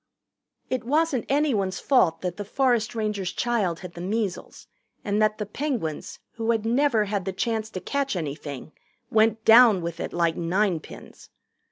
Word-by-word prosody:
It 255 -1 -2
wasn't 295 0 0
anyone's 245 -10 +1
fault 180 - +2
that 180 -1 -4
the 205 - -4
forest 240 0 0
ranger's 210 -4 -2
child 210 -9 -1
had 180 -2 -9
the 170 - -8
measles 200 0 -3 0.4
and 205 0 0
that 215 0 +2
the 210 - -3
Penguins 215 - -4 0.2
who 225 0 -2
had 225 -2 +1
never 235 -2 +2
had 200 -2 -2
the 190 - -2
chance 220 +2 -2
to 185 - -6
catch 275 +6 -2
anything 145 -3 -5 0.4
went 220 0 +2
down 225 -5 +7
with 170 0 -5
it - - -4
like 170 -2 +1
ninepins. 175 0 -3
215 Hz, 160 wpm, -25 LUFS, 180-235 Hz, 0.4 s, down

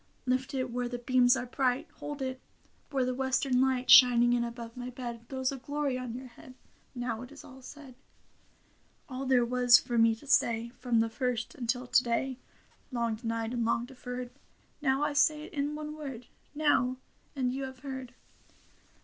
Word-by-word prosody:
Lift 255 +2 -1
it 255 -2 -2
where 245 0 -2
the 245 - -4
beams 250 +1 +4
are - - -3
bright; 250 0 0
Hold 290 -2 -5
it 260 0 -4 0.5
where 265 -3 0
the 255 - -1
western 265 0 +1
light. 260 -1 +2
Shining 240 -1 +8
in 240 -1 +2
above 235 -1 -7
my 245 0 -6
bed. 240 -2 -7
Throws 260 -1 -1
a 275 - -5
glory 285 +1 -2
on 250 -2 -5
your 255 +1 -7
head. 255 +1 -14 0.4
Now 240 -2 -3
it 250 +2 -10
is 290 - -12
all 265 0 -13
said. 275 0 -11 1.1
All 265 0 -5
there 250 -2 +4
was 245 0 +6
for 240 -1 -1
me 225 0 +5
to 225 - -16
say 235 -4 +2
From 235 -1 0
the 225 - 0
first 240 -1 -2
until 245 +1 -2
to 250 - +4
day. 255 +2 -1 0.5
Long 235 -2 0
denied 225 0 -3
and 240 -1 0
long 235 +1 +1
deferred. 250 -1 -7 0.5
Now 270 0 +2
I 295 - 0
say 300 +1 +3
it - - -11
in 290 +1 -1
one 305 0 -6
word 270 -6 -7 0.2
— - - -36
Now; 255 -3 +3 0.4
and 255 -2 0
you 270 +1 -3
have 260 -1 -10
heard. 260 -2 -6
250 Hz, 190 wpm, -30 LUFS, 240-265 Hz, 1.1 s, Shining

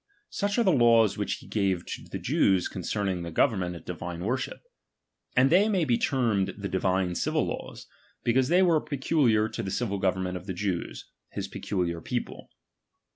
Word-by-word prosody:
Such 205 +2 -1
are 235 - +4
the 190 - +4
laws 115 - +5
which - - -2
he - - -9
gave 95 -4 0
to - - -6
the - - -6
Jews 95 -2 +2
concerning 95 0 -2
their 85 0 -5
government 90 - +1
and 85 - -11
divine 85 0 -5
worship; 125 +4 -3 0.7
and 130 +3 +4
they 200 +5 +5
may 190 -6 +2
be 120 -4 +2
termed 110 -7 0
the 100 -1 -4
divine 95 -1 0
civil - - 0
laws, - - -6 0.4
because 125 +2 +2
they 180 +5 +4
were 165 -4 +3
peculiar 135 -6 +2
to 115 - -4
the 95 - -4
civil 100 -1 -2
government 95 -1 0
of 90 +2 -11
the 95 - -3
Jews, 90 -2 -3 0.3
his - - -3
peculiar 85 -4 -3
people. - - -5
105 Hz, 180 wpm, -27 LUFS, 90-130 Hz, 0.7 s, laws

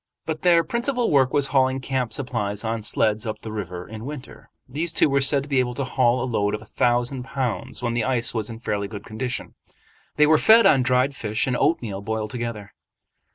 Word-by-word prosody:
But 155 -1 -4
their 170 -2 +4
principal 245 +1 -1
work 135 -3 +4
was 145 -1 +1
hauling 130 -1 +3
camp 130 -3 -2
supplies 110 -6 -3
on 115 0 -2
sleds 110 0 0
up 110 0 -5
the 110 - -7
river 90 -4 -6
in 110 0 -8
winter. 140 0 -9 0.2
These 160 +6 -3
two - - +4
were 140 -1 +1
said 140 0 +4
to 145 - -12
be 135 -2 +2
able 125 -1 -1
to 140 - -2
haul 125 -1 +1
a - - -1
load 105 -4 0
of 105 - -8
a - - -16
thousand 120 +4 0
pounds 130 -2 -4
when 120 -1 0
the 120 -1 0
ice 120 -1 0
was 110 -2 -3
in 115 - -7
fairly 105 -3 -3
good 100 -1 -9
condition. 120 +3 -4 0.6
They 150 - +5
were 155 +1 +4
fed 225 +1 +6
on 135 - +5
dried 130 +2 +1
fish 110 -2 -1
and 125 - -1
oatmeal 110 -10 0
boiled 110 +1 -3
together. 115 -5 -5
125 Hz, 215 wpm, -23 LUFS, 110-135 Hz, 0.6 s, fed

